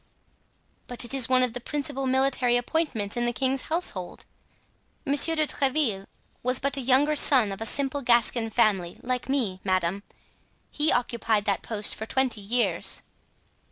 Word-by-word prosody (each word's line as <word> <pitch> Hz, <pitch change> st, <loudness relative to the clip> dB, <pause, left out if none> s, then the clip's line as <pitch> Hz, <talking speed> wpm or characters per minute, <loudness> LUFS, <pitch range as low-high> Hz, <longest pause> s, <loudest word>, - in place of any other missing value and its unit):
"But 245 Hz, 0 st, -2 dB
it 240 Hz, -, -1 dB
is 260 Hz, -3 st, +2 dB
one 255 Hz, 0 st, +3 dB
of 250 Hz, -3 st, -1 dB
the 245 Hz, -, -5 dB
principal 275 Hz, 0 st, -3 dB
military 260 Hz, -2 st, +2 dB
appointments 245 Hz, -6 st, -2 dB
in 240 Hz, 0 st, -1 dB
the 240 Hz, -, 0 dB
king's 265 Hz, +2 st, -1 dB
household." 310 Hz, -, -3 dB, 0.8 s
"Monsieur 290 Hz, +3 st, +3 dB
de 310 Hz, -1 st, +2 dB
Tréville 265 Hz, -8 st, -1 dB, 0.3 s
was 255 Hz, +1 st, +2 dB
but 275 Hz, 0 st, 0 dB
a 275 Hz, -, -2 dB
younger 270 Hz, +4 st, +2 dB
son 255 Hz, -7 st, +5 dB
of 195 Hz, -, -7 dB
a 225 Hz, -, -1 dB
simple 280 Hz, +3 st, -1 dB
Gascon 235 Hz, -2 st, +1 dB
family, 210 Hz, -7 st, +1 dB
like 250 Hz, +1 st, -3 dB
me, 230 Hz, -9 st, -1 dB
madame; 185 Hz, 0 st, -1 dB, 0.7 s
he 300 Hz, +1 st, +1 dB
occupied 230 Hz, -3 st, 0 dB
that 200 Hz, -2 st, 0 dB
post 210 Hz, -2 st, -2 dB
for 220 Hz, -, -7 dB
twenty 260 Hz, -5 st, 0 dB
years." 200 Hz, -4 st, 0 dB
245 Hz, 160 wpm, -25 LUFS, 215-275 Hz, 0.8 s, son